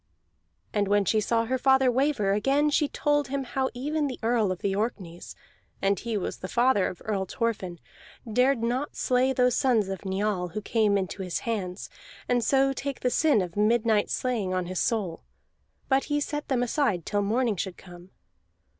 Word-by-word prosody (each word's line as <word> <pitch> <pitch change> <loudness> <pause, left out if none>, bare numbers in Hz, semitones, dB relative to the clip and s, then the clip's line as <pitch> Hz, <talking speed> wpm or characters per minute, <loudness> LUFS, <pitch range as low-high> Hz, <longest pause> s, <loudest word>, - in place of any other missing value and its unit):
And 205 -2 +1
when 205 0 +2
she 215 +3 +2
saw 230 +2 +1
her 260 +2 -1
father 265 -1 +4
waver 260 -6 +1
again 275 +8 +2
she 295 0 +2
told 290 -1 0
him 275 +1 -2
how 260 +1 -1
even 295 +4 -1
the 255 - -5
Earl 225 -4 +2
of 185 - -5
the 195 -1 0
Orkneys 195 -6 -4 0.4
(and 195 -1 +1
he 230 -2 -2
was 190 - -3
father 235 +1 +2
of 180 - -8
Earl 200 -3 -1
Thorfinn) 210 -8 -3 0.5
dared 250 0 +3
not 250 +5 -1
slay 255 +1 +2
those 250 -1 +2
sons 225 -7 +2
of 195 0 -5
Njal 190 -1 -1
who 215 - -2
came 215 -3 +2
into 190 0 -3
his 180 -2 -3
hands, 195 -5 -3 0.4
and 245 -1 +1
so 270 +3 +3
take 275 0 -5
the 250 - +1
sin 290 -10 +3
of 175 -1 -7
midnight 215 0 +2
slaying 220 -8 -1
on 185 -1 -1
his 185 +1 -3
soul; 200 -8 -1 0.7
but 270 0 +2
he 295 0 0
set 295 0 -3
them 250 -3 +1
aside 235 - 0
till 205 -1 0
morning 225 +2 +1
should 185 0 -4
come. 175 0 -13
230 Hz, 180 wpm, -27 LUFS, 195-260 Hz, 0.7 s, father